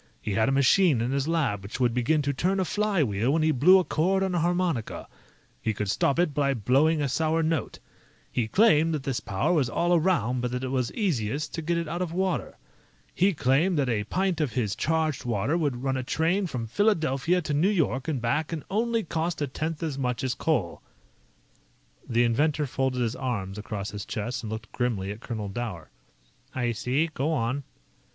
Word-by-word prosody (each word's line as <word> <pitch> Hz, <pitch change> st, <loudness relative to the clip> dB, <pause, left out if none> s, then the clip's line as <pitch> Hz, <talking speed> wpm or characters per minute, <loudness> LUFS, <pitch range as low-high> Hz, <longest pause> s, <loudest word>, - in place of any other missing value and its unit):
He 105 Hz, -, -4 dB
had 110 Hz, +5 st, +2 dB
a -, -, +1 dB
machine 140 Hz, +2 st, +4 dB
in 120 Hz, +3 st, -1 dB
his 140 Hz, +1 st, 0 dB
lab 140 Hz, -12 st, 0 dB
which 100 Hz, +6 st, -7 dB
would 120 Hz, -2 st, +2 dB
begin 135 Hz, +5 st, +1 dB
to 140 Hz, 0 st, 0 dB
turn 185 Hz, +8 st, 0 dB
a 190 Hz, -, +1 dB
flywheel 145 Hz, -, +1 dB
when 160 Hz, 0 st, +2 dB
he 155 Hz, -, +3 dB
blew 155 Hz, +8 st, +6 dB
a 185 Hz, -, +3 dB
chord 190 Hz, +4 st, +1 dB
on 190 Hz, -1 st, -1 dB
a 175 Hz, -, +1 dB
harmonica. 175 Hz, -8 st, -1 dB, 0.5 s
He 110 Hz, -, -1 dB
could 105 Hz, -1 st, -1 dB
stop 140 Hz, -, +1 dB
it 175 Hz, -4 st, +2 dB
by 140 Hz, -1 st, +1 dB
blowing 145 Hz, +7 st, +2 dB
a -, -, +1 dB
sour 160 Hz, +4 st, +1 dB
note. 160 Hz, -5 st, -1 dB, 0.5 s
He 115 Hz, -3 st, 0 dB
claimed 165 Hz, -, +4 dB
that 145 Hz, -, -4 dB
this 135 Hz, -2 st, -1 dB
power 95 Hz, -, 0 dB
was 140 Hz, -8 st, +2 dB
all 175 Hz, +8 st, +1 dB
around, 160 Hz, -8 st, +2 dB
but 125 Hz, -, -1 dB
that 125 Hz, +1 st, -3 dB
it 130 Hz, -, -2 dB
was 130 Hz, -2 st, -1 dB
easiest 145 Hz, -, -1 dB
to 165 Hz, -, -3 dB
get 170 Hz, +2 st, 0 dB
it 170 Hz, -1 st, -2 dB
out 170 Hz, +3 st, -3 dB
of 170 Hz, -2 st, -2 dB
water. 185 Hz, 0 st, -1 dB, 0.6 s
He 190 Hz, 0 st, +2 dB
claimed 145 Hz, +7 st, +2 dB
that 135 Hz, -3 st, +1 dB
a 105 Hz, -3 st, 0 dB
pint 185 Hz, -, 0 dB
of 145 Hz, -6 st, -1 dB
his 110 Hz, -6 st, -1 dB
charged 160 Hz, -3 st, 0 dB
water 120 Hz, +4 st, 0 dB
would 145 Hz, -7 st, -1 dB
run 135 Hz, -1 st, 0 dB
a -, -, -1 dB
train 170 Hz, +9 st, 0 dB
from 125 Hz, -7 st, -4 dB
Philadelphia 165 Hz, -, +1 dB
to 150 Hz, -, -2 dB
New 160 Hz, +7 st, +3 dB
York 145 Hz, -9 st, 0 dB
and 150 Hz, -5 st, -1 dB
back 145 Hz, +8 st, -1 dB
and 160 Hz, -4 st, -4 dB
only 230 Hz, +2 st, +1 dB
cost 165 Hz, +1 st, -2 dB
a 145 Hz, -, 0 dB
tenth 155 Hz, +4 st, -4 dB
as 145 Hz, -4 st, -3 dB
much 125 Hz, -2 st, -1 dB
as 130 Hz, -2 st, 0 dB
coal." 125 Hz, -, -1 dB, 1.3 s
The 120 Hz, 0 st, +3 dB
inventor 145 Hz, +6 st, +1 dB
folded 130 Hz, -1 st, -1 dB
his 115 Hz, +1 st, -1 dB
arms 105 Hz, -7 st, -3 dB
across 105 Hz, -1 st, -5 dB
his 105 Hz, -2 st, -6 dB
chest 120 Hz, +5 st, -3 dB
and 110 Hz, -2 st, -6 dB
looked 110 Hz, -1 st, -6 dB
grimly 110 Hz, -6 st, -1 dB
at 105 Hz, -, -7 dB
Colonel 110 Hz, -4 st, -4 dB
Dower. 100 Hz, -5 st, -5 dB, 0.6 s
"I 120 Hz, -2 st, 0 dB
see. 135 Hz, +8 st, 0 dB
Go 145 Hz, +4 st, -1 dB
on." 130 Hz, -1 st, -1 dB
140 Hz, 205 wpm, -26 LUFS, 120-165 Hz, 1.3 s, blew